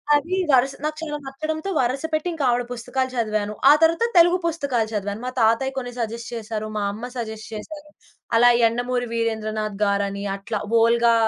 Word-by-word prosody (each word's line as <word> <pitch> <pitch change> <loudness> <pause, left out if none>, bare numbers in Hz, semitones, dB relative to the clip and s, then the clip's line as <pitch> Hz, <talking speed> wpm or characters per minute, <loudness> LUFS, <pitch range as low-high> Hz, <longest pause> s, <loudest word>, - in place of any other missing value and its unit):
అది 330 +6 0 0.2
వరస 265 +1 +4
నాకు 305 0 -2
చాలా 300 -2 -3
నచ్చడంతో 310 +6 -4
వరుస 260 +3 0
పెట్టి, 310 +2 0
ఇంకా 315 -4 -3
ఆవిడ 245 0 +1
పుస్తకాలు 250 +2 -2
చదివాను. 215 -3 -1 0.2
ఆ - - +10
తరువాత 330 +8 +4
తెలుగు 345 +1 +6
పుస్తకాలు 280 -9 0
చదివాను. 205 +1 -3
మా 255 - -2
తాతయ్య 230 +5 +2
కొన్ని 245 -2 -3
సజెస్ట్ 230 0 -4
చేశారు, 215 -1 -4
మా 210 - -1
అమ్మ 230 +5 -7
సజెస్ట్ 220 -2 -5
చేశారు. 300 +8 -8 0.5
అలా 245 +1 +7
యండమూరి 245 +2 +1
వీరేంద్రనాథ్ 215 -2 -2
గారని, 200 0 -1
అట్లా 210 +2 -4 0.2
వోల్గా 235 +1 +4
240 Hz, 165 wpm, -23 LUFS, 220-275 Hz, 0.5 s, ఆ